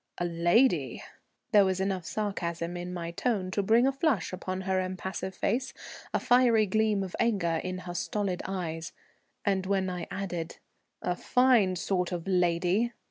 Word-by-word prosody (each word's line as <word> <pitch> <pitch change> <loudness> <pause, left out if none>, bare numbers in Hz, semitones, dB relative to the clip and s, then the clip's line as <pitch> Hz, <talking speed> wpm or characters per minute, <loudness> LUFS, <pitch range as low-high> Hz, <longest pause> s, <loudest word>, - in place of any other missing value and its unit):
"A 175 - -1
lady!" 170 - +2 0.5
There 205 -1 +7
was 190 -1 0
enough 190 -2 -1
sarcasm 175 -5 -3
in 175 0 -5
my 170 -2 -4
tone 190 -1 -1
to 200 - +1
bring 225 +5 +4
a 270 - +4
flush 270 - 0
upon 185 0 -4
her 190 0 0
impassive 185 +1 -4
face, 255 +5 -1 0.4
a - - +1
fierce 240 -3 +4
gleam 215 -2 +2
of 185 - -6
anger 185 -8 +1
in 185 0 -3
her 175 - -5
stolid 195 -1 -2
eyes; 170 -4 -4 0.5
and 190 -2 +1
when 190 -1 +1
I 180 -1 -5
added, 175 -4 -4 0.5
"A 180 - 0
fine 240 -5 +3
sort 180 0 -1
of 175 -2 -4
lady!" 180 +5 +2
185 Hz, 160 wpm, -29 LUFS, 175-210 Hz, 0.5 s, There